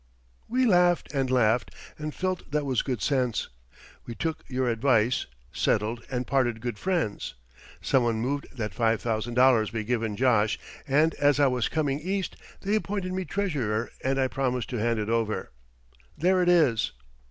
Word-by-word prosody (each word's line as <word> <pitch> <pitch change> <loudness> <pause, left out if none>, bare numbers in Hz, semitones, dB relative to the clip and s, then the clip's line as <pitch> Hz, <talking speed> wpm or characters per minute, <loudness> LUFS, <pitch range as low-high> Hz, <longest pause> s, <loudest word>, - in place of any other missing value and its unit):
We 255 +2 +2
laughed 175 -6 +3
and 135 -2 0
laughed 120 -2 +2 0.2
and 155 0 -5
felt 185 -1 -2
that 150 0 -1
was 130 -3 +1
good 125 -6 -3
sense. 130 -5 0 0.6
We 120 - -6
took 160 +4 -3
your 130 -1 -1
advice, 120 0 +2 0.3
settled, 110 +3 0
and 125 -1 -2
parted 120 -4 +1
good 120 -2 -4
friends. 170 - -2 0.5
Some 135 - +3
one 115 -1 +1
moved 140 +5 -2
that 105 -4 -3
five 115 0 +1
thousand 115 +1 -2
dollars 125 -4 +5
be 115 -1 -3
given 115 -2 -1
Josh, 115 -5 +3 0.3
and 150 +4 +3
as 145 0 +4
I 145 - +6
was 125 -3 +1
coming 145 -3 0
East 190 +4 -2 0.3
they 200 +1 -1
appointed 200 -3 -1
me 185 0 -2
treasurer 130 - -1
and 135 +1 +1
I 130 - +3
promised 125 -3 -2
to 125 - -2
hand 115 0 +1
it 105 -1 -2
over. 115 -1 -1 0.7
There 185 +3 +3
it 175 - +3
is." 150 -11 +3
130 Hz, 170 wpm, -27 LUFS, 115-155 Hz, 0.7 s, I